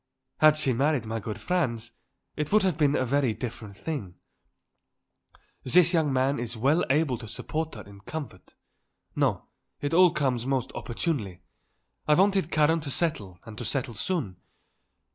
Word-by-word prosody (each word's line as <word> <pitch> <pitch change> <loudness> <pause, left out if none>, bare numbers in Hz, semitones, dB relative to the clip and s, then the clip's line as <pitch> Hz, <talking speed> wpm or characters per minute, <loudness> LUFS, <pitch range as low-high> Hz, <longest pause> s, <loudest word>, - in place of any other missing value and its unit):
Had 155 0 +6
she 140 -4 +1
married 135 0 +1
my 115 +1 -3
good 105 0 -6
Franz, 120 -11 -1 0.4
it 150 -1 -3
would 215 0 +4
have 185 -4 +1
been 145 -2 +2
a 130 - +1
very 130 -3 +1
different 110 -5 -7
thing. 110 - -5 1.5
This 170 +6 +4
young 160 -4 +2
man 130 +1 +1
is 120 -1 -4
well 140 +9 +2
able 135 -4 +2
to 110 - -9
support 155 +8 -4
her 105 - -8
in 100 0 -14
comfort. 140 -5 -8 0.6
No; - - 0 0.3
it 145 +2 -3
all 180 +1 +7
comes 130 -6 -1
most 135 -3 -1
opportunely. 110 - -3 0.6
I 150 - +5
wanted 195 -2 +3
Karen 155 +1 +3
to 150 -2 -5
settle 110 - -2
and 110 - -9
to - - -4
settle 135 -3 -1
soon. 115 - -2
140 Hz, 160 wpm, -27 LUFS, 115-160 Hz, 1.5 s, all